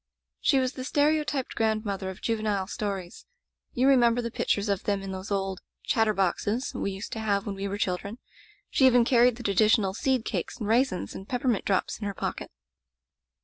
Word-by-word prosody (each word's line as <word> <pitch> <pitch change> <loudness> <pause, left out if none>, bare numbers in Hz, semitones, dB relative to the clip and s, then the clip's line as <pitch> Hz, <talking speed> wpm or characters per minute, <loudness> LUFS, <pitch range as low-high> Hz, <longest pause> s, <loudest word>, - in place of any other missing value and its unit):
"She 275 - +3
was 260 0 +1
the 255 - -6
stereotyped 295 -1 +1
grandmother 215 -4 -1
of 190 - -9
juvenile 215 -4 0
stories. 195 -3 -5 0.5
You 255 +2 +2
remember 245 -3 +5
the 235 -1 -3
pictures 205 -2 0
of 200 -2 -1
them 200 -1 0
in 195 - -5
those 190 +1 -6
old 195 -2 -2 0.2
Chatterboxes' 215 +2 +1
we - - -2
used 195 +2 -6
to 225 - -4
have 200 -2 0
when 205 - -3
we 195 0 -4
were 200 +1 -3
children. 200 +2 -2 0.5
She 265 - +5
even 245 -2 +5
carried 245 -1 +4
the 240 - -9
traditional 205 -1 +3
seed 255 +1 0
cakes - - -3
and 215 - -4
raisins 235 -3 +1
and 195 - -9
peppermint 245 -4 0
drops 195 -2 0
in 205 - -3
her 200 - -4
pocket. - - -4
215 Hz, 185 wpm, -27 LUFS, 195-245 Hz, 0.5 s, remember